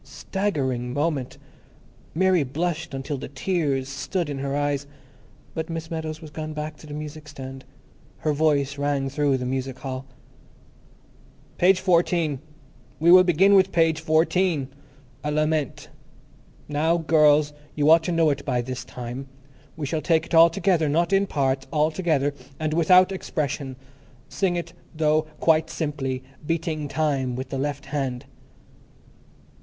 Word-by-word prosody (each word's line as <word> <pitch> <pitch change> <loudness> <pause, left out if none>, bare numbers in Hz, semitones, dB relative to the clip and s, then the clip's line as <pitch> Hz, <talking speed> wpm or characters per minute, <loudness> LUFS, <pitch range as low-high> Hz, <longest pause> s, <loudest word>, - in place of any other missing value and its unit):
Staggering 130 -11 -2
moment! 145 -3 -1 0.8
Mary 185 0 +3
blushed 155 +2 -2
until 135 +1 -4
the - - -6
tears 140 -2 -1
stood 145 +4 -3
in 135 - -4
her 140 0 -2
eyes, 145 -1 -1 0.7
but 160 +1 -4
Miss 165 0 -5
Meadows 160 -1 -4
was 155 - -10
gone 155 0 -5
back 150 0 -5
to 155 - -13
the 145 - -8
music 150 0 -7
stand; 135 -2 -9 0.5
her 155 - 0
voice 145 -2 +1
rang 145 -1 0
through 140 -1 +1
the 125 - -4
music 130 0 -3
hall. 130 0 -6 1.5
"Page 185 +1 +5
fourteen. 170 -5 +2 0.6
We 170 +2 +5
will 185 0 +9
begin 185 +3 +4
with 190 -1 +5
page 165 -2 +2
fourteen. 160 -2 +2 0.5
'A 150 0 -1
Lament.' 155 -2 -1 0.8
Now, 160 +3 +1
girls, 150 -2 +4 0.2
you 145 -1 +1
ought 165 0 +7
to - - -1
know 165 -2 +3
it 140 0 -3
by 125 -3 0
this 130 +1 -5
time. 125 +2 -7 0.5
We 155 - -3
shall 155 +2 -2
take 160 +2 +2
it - - -11
all 165 +1 +8
together; 170 -3 +1
not 170 +5 +1
in 195 +1 +3
parts, 135 -4 0
all 155 0 +2
together. 155 -5 0 0.3
And 155 -1 -1
without 180 +3 +5
expression. 145 -7 -3 0.5
Sing 185 -3 0
it, 170 -1 -4 0.2
though, 155 0 +2
quite 160 0 +3
simply, 135 -5 -3 0.2
beating 155 -1 -2
time 140 -5 0
with 130 +1 -5
the 135 - -3
left 145 0 -3
hand." 130 -4 -2
150 Hz, 150 wpm, -24 LUFS, 140-165 Hz, 1.5 s, will